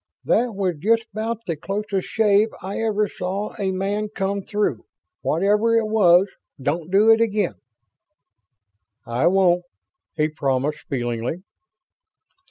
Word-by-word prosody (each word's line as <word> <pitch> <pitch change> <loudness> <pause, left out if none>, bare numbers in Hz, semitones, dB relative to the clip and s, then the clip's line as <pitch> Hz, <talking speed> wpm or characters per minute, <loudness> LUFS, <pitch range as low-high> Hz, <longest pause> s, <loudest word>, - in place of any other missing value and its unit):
"That 235 -2 +1
was 185 -4 -1
just 225 +6 +2
about 225 +1 -3
the 170 - -2
closest 195 +4 -3
shave 215 0 +3
I 195 +2 -4
ever 215 -2 +1
saw 190 +3 -4
a 195 -2 0
man 200 +3 -2
come 200 -1 -2
through. 200 - -2 0.4
Whatever 210 +7 +2
it 225 - +2
was, 195 -4 +5 0.3
don't 155 +5 -2
do 205 +4 +5
it 225 0 +5
again." 210 -4 +1 1.5
"I 120 +5 +1
won't," 180 -1 +3 0.5
he 155 0 +2
promised, 140 -1 -2
feelingly. 120 +5 -3
195 Hz, 125 wpm, -22 LUFS, 170-215 Hz, 1.5 s, was